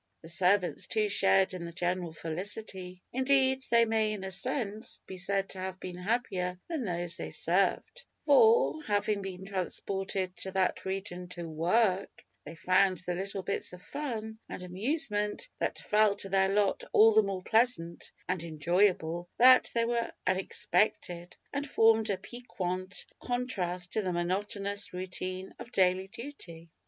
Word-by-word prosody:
The 165 - -8
servants 180 +2 +2
too 215 -1 +1
shared 195 -1 +3
in 180 -2 -5
the 170 - -6
general 175 0 -2
felicity. 180 +2 -4
Indeed, 265 0 +3
they 235 0 +5
may, 220 -1 +1
in 200 -2 -6
a 190 - -4
sense, 215 +3 -1
be 190 - -8
said 195 +1 0
to 190 - -7
have 185 0 -5
been 180 -1 -7
happier 180 -4 -1
than 315 -8 -3
those 175 -2 -1
they - - -5
served, - - 0 0.2
for, 460 -8 +5
having 205 0 0
been 190 -1 -7
transported 190 0 -2
to 190 - -5
that 190 -1 0
region 190 -2 -4
to 170 -1 -5
work, 185 +5 0 0.2
they 155 +3 -8
found 185 +2 +3
the 180 0 -3
little 195 +1 -4
bits 190 0 -3
of 180 0 -11
fun 225 -7 -5
and 180 - -6
amusement 210 - -1
that - - -1
fell 210 -1 +3
to 195 -1 -3
their 190 0 +3
lot 200 0 +1
all 220 +1 +7
the 220 - +7
more 195 -2 -4
pleasant 220 -8 +1 0.2
and 180 -2 -1
enjoyable, 175 +1 +1
that 255 +1 +7
they 230 0 +2
were 235 0 -1
unexpected, 180 -1 0 0.2
and 285 0 -3
formed 225 -2 +4
a 195 - 0
piquant 185 -6 -5
contrast 185 -8 -2
to 220 - +2
the 185 -3 -2
monotonous 200 +3 -2
routine 185 +1 -5
of 240 0 -9
daily 185 -1 +2
duty. 190 - -10
195 Hz, 155 wpm, -30 LUFS, 180-220 Hz, 0.2 s, all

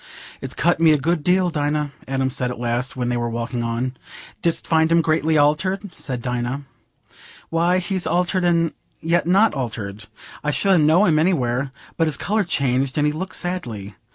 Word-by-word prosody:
"It's - - -4
cut 175 +2 +2
me 165 -1 +6
a - - +3
good 160 +2 0
deal, 180 +1 +2
Dinah," 150 -1 -1 0.2
Adam 135 0 0
said 125 -2 -1
at 125 - -5
last, 120 +2 -2
when 120 -1 -1
they 120 - 0
were 120 0 -1
walking 120 +1 -3
on. 120 +3 -2 0.5
"Didst 170 -1 0
find 160 0 +2
him 165 0 +4
greatly 155 0 +2
altered?" 180 +7 +1
said 125 -4 -5
Dinah. 125 +2 -2 0.9
"Why, 170 +2 +2
he's 185 -1 -1
altered 180 +2 +1
and 170 -2 +2 0.3
yet 170 +1 +1
not 200 +5 +4
altered. 110 -6 -5 0.4
I 150 - 0
should 190 +4 +3
ha' - - +3
known 170 +6 +5
him 155 -2 +3
anywhere. 135 -6 +1 0.3
But 165 - +2
his 155 - +1
colour's 210 -2 0
changed, 130 -2 0
and 150 - +3
he 150 - +1
looks 185 +5 -3
sadly. 120 - -4
150 Hz, 185 wpm, -21 LUFS, 125-175 Hz, 0.9 s, me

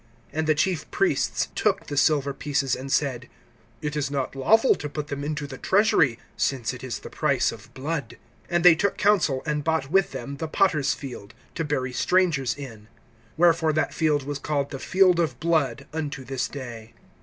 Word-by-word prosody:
(6)And 160 0 -1
the 155 - +4
chief 175 0 0
priests 390 -1 0
took - - 0
the 145 - -5
silver 140 -1 +2
pieces, 140 -2 -1
and 135 +1 -7
said: 125 -4 0 0.5
It 150 0 -2
is 145 -2 -1
not 140 -1 -3
lawful 220 - +4
to 150 - -5
put 150 0 -5
them 140 0 -4
into 150 0 -3
the 135 -2 -9
treasury, 185 - +3 0.2
since 130 -3 -1
it 125 - -10
is 125 -3 -4
the - - -10
price - - +1
of - - -12
blood. 140 -2 -4 0.3
(7)And 175 -1 +1
they 180 -1 +9
took 200 +5 0
counsel, 185 -10 +2
and 150 -1 -1
bought 160 -3 -1
with 195 0 +3
them 140 0 -6
the 160 - -3
potter's 155 -4 +2
field, 120 -7 -9 0.2
to 165 - -2
bury 130 -4 -2
strangers 165 -4 +2
in. 115 -7 -9 0.5
(8)Wherefore 165 -2 +3
that 155 - 0
field 150 -3 +1
was 145 +1 -4
called 140 -1 -2
the 135 - -5
field 185 0 +3
of 145 -8 0
blood, 145 -6 0
unto 145 -4 -4
this 130 0 -2
day. 120 -5 -9
145 Hz, 190 wpm, -25 LUFS, 135-160 Hz, 0.5 s, they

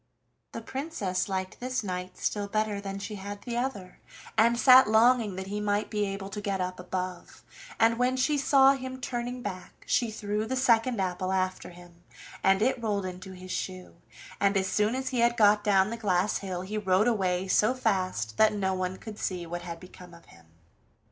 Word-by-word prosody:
The 230 - -6
Princess 220 - -3
liked 190 -1 -3
this 255 -1 -2
knight 180 -1 -5
still 205 -1 -2
better 215 -1 -1
than 195 -1 -5
she 205 +1 -6
had 200 +1 -6
liked - - -21
the 240 -1 -3
other, 225 -8 -4 0.4
and 235 +2 +4
sat 255 -1 +7
longing 225 -2 +4
that 190 0 -5
he 205 +2 -4
might 205 0 -1
be 210 -1 0
able 195 0 -5
to 205 +1 -6
get 200 -1 -2
up 185 0 -3
above, 180 0 -5 0.4
and 230 +1 +3
when 250 +1 +2
she 295 +4 +2
saw 275 -1 +5
him 260 -1 -6
turning 245 0 -4
back 185 -3 -7
she 235 - +1
threw 210 0 -3
the 260 - -2
second 240 -2 +2
apple 185 0 -1
after 185 -1 -1
him, 175 -1 -15 0.4
and 195 +2 +4
it 255 0 +1
rolled 205 -4 -1
into 185 +1 -7
his 185 0 -10
shoe, 185 -1 -5 0.4
and 200 0 +2
as 190 - +1
soon 210 +4 +1
as 260 0 -2
he 250 - -2
had 235 +1 +3
got 210 -1 +5
down 195 0 +3
the 230 - -4
glass 200 -2 +1
hill 185 -3 -4
he 210 +3 -4
rode 190 +2 +2
away 190 -5 0
so 215 +6 +3
fast 185 - -1
that 215 0 +5
no 190 -2 0
one 185 0 -2
could 215 0 -9
see 180 -2 -3
what 175 +1 -5
had 170 -1 -7
become 180 -1 -13
of 170 - -17
him. 85 -1 -19
205 Hz, 200 wpm, -28 LUFS, 185-230 Hz, 0.4 s, sat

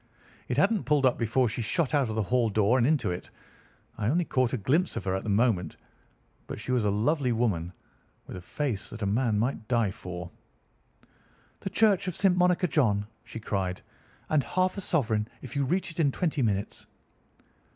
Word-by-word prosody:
It 125 - -2
hadn't 200 +5 +2
pulled 150 -2 +3
up 130 - +2
before 120 +2 +2
she 115 +2 -3
shot 135 +7 0
out 140 -5 +2
of 110 - -3
the 110 - +1
hall 120 +3 +1
door 110 +4 +3
and 120 - +3
into 150 - +1
it. 90 - -6 0.7
I 105 - 0
only 170 +7 +2
caught 130 -5 +1
a - - -1
glimpse 145 - +1
of - - -3
her 95 - -1
at 95 - -1
the - - -4
moment, 100 -6 +1 0.7
but - - -6
she 125 - -4
was 125 -3 +2
a - - +3
lovely 125 +6 +1
woman, 105 -8 0 0.5
with - - -9
a 90 - -7
face 115 0 -3
that 110 -1 -7
a - - +1
man 110 +2 +1
might 110 0 -1
die 115 -5 +1
for. 90 -2 -7 1.3
"'The - - -4
Church 205 -4 +3
of 180 - -2
St. 190 -3 +3
Monica, 180 0 +3
John,' 110 -10 +2 0.2
she 115 - -7
cried, 95 -4 -3 0.4
'and 150 -3 +2
half 185 +4 0
a 200 - -4
sovereign 110 - 0 0.2
if 130 - -8
you 140 - +1
reach 185 +5 -1
it 170 - -10
in 145 -4 +3
twenty 155 -1 -1
minutes. 105 -4 -2
120 Hz, 200 wpm, -28 LUFS, 105-150 Hz, 1.3 s, pulled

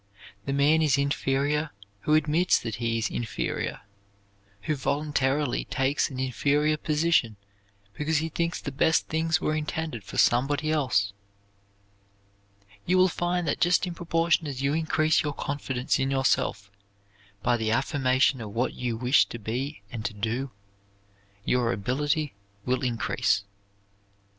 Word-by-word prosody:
The - - 0
man 145 +3 +3
is 150 -3 +3
inferior 140 +1 0 0.3
who 150 +8 +2
admits 155 +4 +3
that 115 -3 -5
he 115 -1 -1
is 115 - 0
inferior, 115 -2 -3 0.8
who 155 - 0
voluntarily 140 -1 0
takes 135 +2 0
an 130 -3 -7
inferior 145 +4 +1
position 150 -7 +1 0.6
because 150 +5 0
he 160 +2 -1
thinks 170 +1 -2
the 145 - -5
best 160 +4 +2
things 160 +1 +1
were 155 - 0
intended 155 -6 -3
for - - -8
somebody 140 +5 +2
else. 125 -10 +1 1.7
You 185 +2 +2
will 185 0 +5
find 175 0 -1
that 145 - -1
just 175 +1 +3
in 180 - -4
proportion 165 -1 +1
as 135 -3 -5
you 140 +1 +1
increase 155 0 +2
your 150 -2 -2
confidence 140 -1 -2
in 135 0 0
yourself 130 -6 0 0.7
by 120 0 +3
the 110 -2 -1
affirmation 130 +1 +2
of 110 - -6
what 115 +5 -1
you 120 -2 -3
wish 125 +4 +4
to - - -7
be 120 +4 -4
and 115 -3 -5
to 110 - -2
do, 115 +6 -2 1.0
your 125 -2 +2
ability 145 - -1 0.3
will 130 +2 0
increase. 115 -5 0
140 Hz, 140 wpm, -27 LUFS, 125-155 Hz, 1.7 s, will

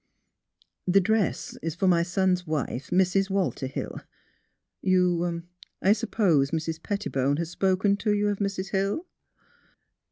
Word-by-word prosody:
The 190 +2 +5
dress 215 0 0
is 165 -1 -3
for 190 +2 +1
my 175 -2 +4
son's 180 0 0
wife, 140 -4 -3
Mrs. 190 +1 +2
Walter 190 -8 -1
Hill. 135 - -5 0.8
You 175 -2 +1 0.2
— - - -47
I 195 - +6
suppose 175 -10 +2
Mrs. 160 0 -3
Pettibone 145 -10 -1
has 170 0 -3
spoken 190 +2 +2
toyouof— 205 -1 0
Mrs. 195 -1 -2
Hill? 200 - 0
185 Hz, 125 wpm, -26 LUFS, 170-200 Hz, 0.8 s, I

